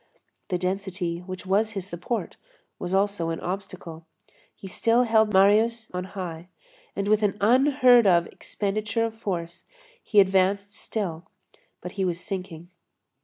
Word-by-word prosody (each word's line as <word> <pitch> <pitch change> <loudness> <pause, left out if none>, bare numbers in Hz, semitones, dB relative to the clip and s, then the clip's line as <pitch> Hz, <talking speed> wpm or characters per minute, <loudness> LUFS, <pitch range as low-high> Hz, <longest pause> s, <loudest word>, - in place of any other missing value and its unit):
The 180 - -1
density, 185 -2 -3
which 185 +1 -8
was 210 +3 +1
his 195 -3 -4
support, 190 +6 -4 0.4
was 175 - -4
also 195 -3 +1
an 165 - -3
obstacle. 175 -3 -6 0.5
He 195 - -10
still 230 +6 +2
held 220 -2 +3
Marius 215 +4 +3
on 180 0 -3
high, 180 -3 -7 0.5
and 200 - -2
with 215 +1 +3
an 205 -1 0
unheard 250 +1 +5
of 170 -2 +4
expenditure 210 +5 -2
of 225 - -4
force, 175 -6 -5 0.4
he 210 - +3
advanced 195 +1 +2
still; 185 -6 -5 0.5
but 180 - -7
he 195 +1 -2
was 175 -2 -1
sinking. 180 -3 -7
195 Hz, 140 wpm, -25 LUFS, 180-215 Hz, 0.5 s, unheard